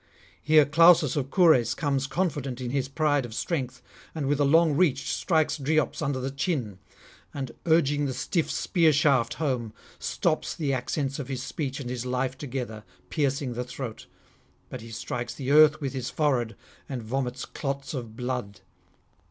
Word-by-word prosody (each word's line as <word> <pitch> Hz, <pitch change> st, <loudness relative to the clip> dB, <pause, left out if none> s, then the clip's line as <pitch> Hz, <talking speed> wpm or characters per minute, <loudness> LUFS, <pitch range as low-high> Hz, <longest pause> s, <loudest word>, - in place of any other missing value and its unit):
Here 155 Hz, -1 st, +5 dB
Clausus 165 Hz, 0 st, +5 dB
of 135 Hz, -3 st, -2 dB
Cures 155 Hz, -, +4 dB
comes 140 Hz, -4 st, -1 dB
confident 140 Hz, -5 st, -2 dB
in 125 Hz, -1 st, -4 dB
his 135 Hz, -1 st, 0 dB
pride 145 Hz, -1 st, +1 dB
of 115 Hz, -2 st, -8 dB
strength, 130 Hz, -6 st, -3 dB, 0.3 s
and 155 Hz, -3 st, -2 dB
with 145 Hz, +1 st, +1 dB
a -, -, +4 dB
long 160 Hz, +1 st, +4 dB
reach 140 Hz, -5 st, +2 dB
strikes 155 Hz, -3 st, +1 dB
Dryops 150 Hz, 0 st, 0 dB
under 140 Hz, -3 st, -1 dB
the 130 Hz, +1 st, -3 dB
chin, 135 Hz, -, -2 dB, 0.6 s
and, 135 Hz, -4 st, -4 dB, 0.2 s
urging 145 Hz, -3 st, +3 dB
the 130 Hz, -, -2 dB
stiff 165 Hz, +5 st, -1 dB
spear 165 Hz, -4 st, +2 dB
shaft 135 Hz, -5 st, +2 dB
home, 125 Hz, -8 st, -2 dB, 0.3 s
stops 165 Hz, -3 st, -1 dB
the 145 Hz, -5 st, -1 dB
accents 135 Hz, +2 st, -2 dB
of 140 Hz, -, -5 dB
his 130 Hz, -2 st, -4 dB
speech 140 Hz, -1 st, -4 dB
and 125 Hz, -3 st, -5 dB
his 125 Hz, -2 st, -3 dB
life 130 Hz, +1 st, -1 dB
together, 125 Hz, -6 st, -5 dB, 0.3 s
piercing 140 Hz, -3 st, 0 dB
the 125 Hz, +1 st, -3 dB
throat; 125 Hz, -2 st, -7 dB, 0.6 s
but 130 Hz, -, -7 dB
he 115 Hz, -, -10 dB
strikes 120 Hz, +1 st, -5 dB
the 135 Hz, 0 st, -3 dB
earth 155 Hz, 0 st, +7 dB
with 140 Hz, -3 st, -3 dB
his 130 Hz, -2 st, -3 dB
forehead, 130 Hz, -7 st, 0 dB, 0.3 s
and 130 Hz, -4 st, -4 dB
vomits 125 Hz, +2 st, -3 dB
clots 140 Hz, 0 st, -4 dB
of 115 Hz, -5 st, -6 dB
blood. 125 Hz, -5 st, -4 dB
135 Hz, 170 wpm, -27 LUFS, 125-150 Hz, 0.6 s, earth